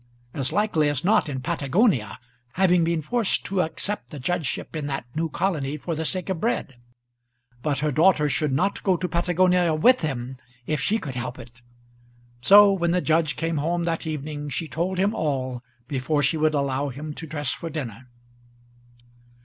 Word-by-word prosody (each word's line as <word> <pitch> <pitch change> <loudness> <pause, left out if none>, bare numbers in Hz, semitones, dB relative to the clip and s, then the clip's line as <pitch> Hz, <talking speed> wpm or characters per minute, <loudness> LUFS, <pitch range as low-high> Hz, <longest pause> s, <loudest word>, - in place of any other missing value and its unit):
As 135 -1 -1
likely 170 -6 +2
as 145 +2 -2
not 200 -5 +3
in 130 -2 -4
Patagonia, 140 - +1 0.4
having 180 -2 +3
been 165 -1 0
forced 235 +4 0
to 190 -1 0
accept 195 +5 -3
a - - -7
judgeship 165 +2 -2
in 150 -2 -3
that 135 -3 -3
new 165 +1 -1
colony 150 -5 -1
for 165 +3 -4
the 160 +1 -3
sake 185 +2 -1
of 190 -4 -3
bread. 220 - -1 0.8
But 145 -1 -1
her 150 - +1
daughter 155 +1 +4
should 150 0 0
not 185 +10 0
go 190 -3 +2
to 180 - -2
Patagonia 175 0 +2
with 250 +11 +4
him 130 -4 -3 0.3
if 155 -1 -1
she 215 +8 +2
could 145 -11 -6
help 125 0 -5
it! 120 0 -13 0.8
So 205 +6 +8
when 170 -3 0
the 180 +1 +2
judge 160 -2 +1
came 165 0 -2
home 170 +4 0
that 165 -1 -2
evening, 150 -1 -4
she 160 +3 -3
told 175 +6 -2
him 200 +3 +2
all 130 - -2 0.3
before 145 +2 0
she 145 +5 +2
would 155 0 +2
allow 140 0 0
him 150 +4 -6
to 160 - -8
dress 145 -3 -3
for 165 - -5
dinner. 130 -6 -6
155 Hz, 180 wpm, -24 LUFS, 140-180 Hz, 0.8 s, So